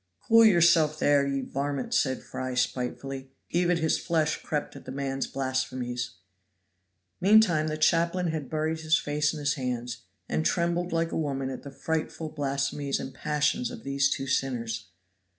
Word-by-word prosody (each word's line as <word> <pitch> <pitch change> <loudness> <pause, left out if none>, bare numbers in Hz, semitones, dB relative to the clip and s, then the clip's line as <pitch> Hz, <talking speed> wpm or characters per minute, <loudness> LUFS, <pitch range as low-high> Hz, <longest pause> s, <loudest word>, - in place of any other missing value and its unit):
"Cool 230 0 +6
yourself 170 -6 +5
there, 145 -2 +3
ye 140 -1 -1
varmint," 140 0 -3
said 130 -2 +1
Fry 130 -1 -5
spitefully. 130 +1 -2 0.2
Even 175 0 +2
his 160 -1 +1
flesh 160 -3 0
crept 150 -2 -3
at - - -11
the 130 - -6
man's 135 0 -2
blasphemies. 130 -3 -2 1.0
Meantime, 190 -6 +5
the 155 0 -2
chaplain 170 +3 +2
had 155 -4 -4
buried 160 +1 -1
his 160 0 +3
face 150 0 0
in 160 - -6
his 145 -1 +1
hands, 125 -2 -3 0.3
and 160 - 0
trembled 175 +1 0
like 165 0 0
a - - -3
woman 135 -4 -1
at 130 - -6
the 140 - -8
frightful 160 +2 -3
blasphemies 140 -1 -1
and 135 - -6
passions 150 - 0
of 240 -2 -9
these 140 0 +2
two 135 - -2
sinners. 115 -5 -2
145 Hz, 160 wpm, -28 LUFS, 135-160 Hz, 1.0 s, Cool